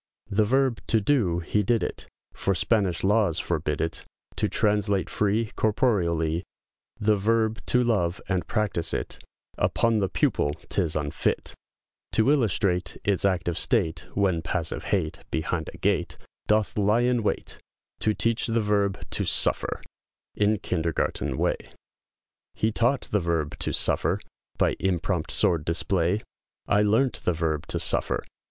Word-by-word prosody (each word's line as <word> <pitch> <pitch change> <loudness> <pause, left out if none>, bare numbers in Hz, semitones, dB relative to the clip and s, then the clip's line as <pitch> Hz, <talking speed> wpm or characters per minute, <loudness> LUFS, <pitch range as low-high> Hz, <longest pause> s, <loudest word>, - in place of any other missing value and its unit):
The 105 +2 +3
verb 130 +1 +2
"to 115 - +4
do," 100 -8 +1
he 105 +5 +1
did 115 +3 +1
it, - - -5 0.3
For 100 - 0
Spanish 95 -2 +1
laws 100 -4 +3
forbid 75 -4 -1
it; 80 0 -2 0.3
To - - +1
translate 105 -2 +1
free, 105 +2 +1
Corporeallee, 85 -8 +1 0.6
The 105 +1 +3
verb 110 +2 +1
"to 125 0 +3
love," 100 -7 +1
and 95 -2 -1
practice 105 -7 -1
it, - - -4 0.4
Upon 115 -2 +2
the 95 -2 0
pupil, 70 - +1 0.2
'tis 85 -6 0
unfit, 75 -1 -1 0.6
To 115 +5 +4
illustrate, 100 -9 +1
Its 100 -1 +1
active 85 -3 0
state, 95 -10 0
When 95 -4 +2
passive 80 0 -3
hate, - - -1
Behind 80 0 -2
a - - -13
gate, - - 0 0.3
Doth 105 0 +1
lie 105 +4 +3
in 120 -1 +2
wait, 105 - -3 0.4
To 110 -1 +1
teach 115 0 0
the 115 0 +1
verb 105 -2 +1
"to - - -1
suffer," - - +1 0.5
In 105 +1 +2
kindergarten 85 -4 -1
way; - - +1 1.0
He 110 - +1
taught 120 +5 +2
the 105 - -1
verb 85 -4 -1
"to - - -1
suffer," - - 0 0.4
By - - +2
impromt 90 -2 0
sword 80 -3 +2
display, 85 +4 0 0.4
I 105 - +3
learnt 115 +5 +2
the 90 - +1
verb 80 -2 -1
"to - - -2
suffer!" - - 0
100 Hz, 145 wpm, -26 LUFS, 85-110 Hz, 1.0 s, to